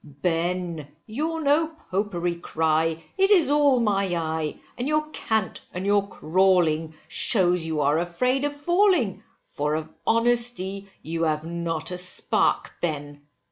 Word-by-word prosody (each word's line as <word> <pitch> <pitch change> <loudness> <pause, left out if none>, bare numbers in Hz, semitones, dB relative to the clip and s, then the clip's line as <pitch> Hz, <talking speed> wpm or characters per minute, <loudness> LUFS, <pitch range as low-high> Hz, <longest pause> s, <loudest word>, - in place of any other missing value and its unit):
Ben, 165 +2 -2 0.2
your 315 +8 -3
No 300 +2 +3
Popery 195 - -3
cry, 160 -1 0 0.2
it 390 +1 +4
is 345 -9 +5
all 290 -3 +4
my 200 -4 +1
eye, 160 -2 -3 0.2
and 245 - -3
your 305 0 +1
cant 220 -8 -2
and 180 +2 -3
your 200 0 +2
crawling, 165 -3 +1
shews 180 -5 +4
you 155 -2 -1
are 145 +3 +2
afraid 250 +11 0
of 290 0 -1
falling, 345 - +2 0.2
for 150 +1 -2
of 160 0 -5
honesty 230 -4 +1 0.2
you 165 +1 -4
have 155 -1 0
not 170 0 -2
a 180 - -2
spark, 180 0 0
Ben. 145 -3 -4
180 Hz, 140 wpm, -24 LUFS, 160-245 Hz, 0.2 s, is